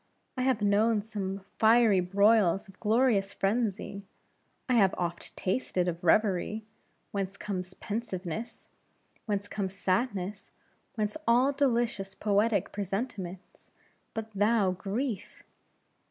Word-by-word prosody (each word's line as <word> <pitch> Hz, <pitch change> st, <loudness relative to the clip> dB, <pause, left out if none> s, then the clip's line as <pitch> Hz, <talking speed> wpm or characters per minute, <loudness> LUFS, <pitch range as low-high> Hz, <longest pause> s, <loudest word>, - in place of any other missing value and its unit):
I 255 Hz, -, -2 dB
have 255 Hz, -4 st, +1 dB
known 210 Hz, +1 st, +3 dB
some 200 Hz, -3 st, -4 dB, 0.2 s
fiery 220 Hz, -3 st, +5 dB
broils 200 Hz, +1 st, +3 dB
of 195 Hz, 0 st, -17 dB
glorious 215 Hz, -3 st, +2 dB
frenzy; 200 Hz, -1 st, -1 dB, 0.7 s
I 255 Hz, -, +1 dB
have 200 Hz, -6 st, +4 dB
oft 175 Hz, -1 st, -3 dB
tasted 185 Hz, -3 st, 0 dB
of 175 Hz, 0 st, -3 dB
revery; 210 Hz, +3 st, +2 dB, 0.5 s
whence 195 Hz, -1 st, -3 dB
comes 185 Hz, -2 st, -5 dB
pensiveness; 210 Hz, -2 st, -5 dB, 0.6 s
whence 205 Hz, -1 st, -1 dB
comes 195 Hz, -2 st, -3 dB
sadness; 195 Hz, 0 st, -1 dB, 0.5 s
whence 210 Hz, +4 st, -1 dB
all 245 Hz, +4 st, +5 dB
delicious 235 Hz, -8 st, 0 dB
poetic 205 Hz, -1 st, +1 dB
presentiments; 195 Hz, -2 st, -5 dB, 0.5 s
but 220 Hz, 0 st, -4 dB
thou, 205 Hz, -1 st, +3 dB
Grief! 205 Hz, +5 st, -4 dB
205 Hz, 110 wpm, -29 LUFS, 190-225 Hz, 0.7 s, fiery